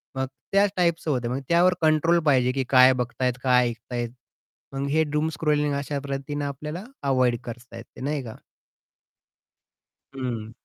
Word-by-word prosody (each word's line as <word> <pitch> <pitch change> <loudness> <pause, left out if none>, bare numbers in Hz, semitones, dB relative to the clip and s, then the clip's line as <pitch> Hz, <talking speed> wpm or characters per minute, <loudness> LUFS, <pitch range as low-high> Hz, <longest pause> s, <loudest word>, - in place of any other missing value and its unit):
मग 130 0 -1 0.2
त्याच 200 0 +4
टाइपचं 170 -3 +1
होतं 125 -3 -1
आहे, 125 - -2
मग - - -5
त्यावर 175 +2 +5
कंट्रोल 160 +2 +3
पाहिजे, 130 -3 +3
की 135 0 -1
काय 130 0 +7
बघतायत 125 0 -1
काय 125 -1 +4
ऐकत 120 +1 -10
आहेत. 120 -1 -2 0.6
मग 140 +1 -2
हे 160 +2 +3
डूम 150 +1 -1
स्क्रोलिंग 150 -1 +1
अशा 140 0 -3
पद्धतीने 140 +1 -4
आपल्याला 150 +6 -5 0.2
अव्हॉइड 130 -3 +2
करता 120 0 -9
येते, 115 - -12
नाही 145 0 -2
का? 110 -2 -9 1.8
हं. 115 -4 -4
135 Hz, 160 wpm, -25 LUFS, 125-150 Hz, 1.8 s, काय